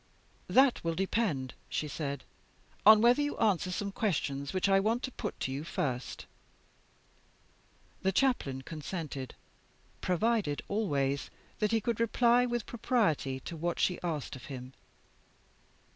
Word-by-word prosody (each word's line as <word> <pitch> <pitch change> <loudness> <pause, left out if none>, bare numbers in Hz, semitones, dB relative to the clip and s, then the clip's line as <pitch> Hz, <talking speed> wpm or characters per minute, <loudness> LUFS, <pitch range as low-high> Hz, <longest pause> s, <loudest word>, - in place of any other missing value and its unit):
'That 265 -1 +4
will 165 0 -1
depend,' 185 - 0 0.2
she 155 - -2
said, 140 -3 -4 0.6
'on 215 0 +10
whether 245 +4 +5
you 290 0 -1
answer 195 -5 +2
some 200 +2 -2
questions 145 -9 -1
which 185 +1 +1
I 195 0 +5
want 225 +5 +1
to 260 - -3
put - - -5
to 130 - -1
you 140 +3 -3
first.' 130 -7 -3 1.8
The 190 - +2
Chaplain 180 - +1
consented; 155 -4 -5 0.7
provided 190 -4 +1
always 140 -10 0 0.3
that 210 -1 +1
he 225 -1 +2
could 230 +1 -1
reply 240 +2 +4
with 240 -2 -2
propriety 165 - 0
to 170 - -7
what 170 +2 -2
she 180 - +1
asked 155 -6 -3
of 130 - -10
him. 130 -1 -8
185 Hz, 135 wpm, -31 LUFS, 140-225 Hz, 1.8 s, on